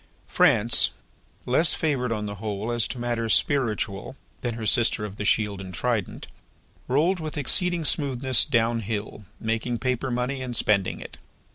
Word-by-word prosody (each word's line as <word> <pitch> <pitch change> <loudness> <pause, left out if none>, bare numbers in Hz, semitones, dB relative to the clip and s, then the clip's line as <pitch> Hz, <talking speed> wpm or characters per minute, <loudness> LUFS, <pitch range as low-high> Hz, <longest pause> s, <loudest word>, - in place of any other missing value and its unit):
France, 115 +3 +4 0.6
less 150 +6 +3
favoured 135 -6 -1
on 105 -2 -2
the 100 - -5
whole 105 +1 -3
as 120 -5 +1
to 125 - -6
matters 120 -2 +1
spiritual 115 -4 -1 0.3
than 120 -2 -3
her 115 -1 -6
sister 115 -1 +3
of 100 -1 -9
the 105 - -4
shield 100 -2 +1
and 95 -2 -9
trident, 115 -1 -2 0.6
rolled 165 +8 +1
with 155 -2 -6
exceeding 175 +4 +1
smoothness 130 -4 +3
down 115 0 +1
hill, 105 -1 -5
making 115 +2 -2
paper 130 +1 -2
money 125 +2 -2
and 125 -2 -4
spending 100 -4 +1
it. - - -11
120 Hz, 155 wpm, -25 LUFS, 105-130 Hz, 0.6 s, France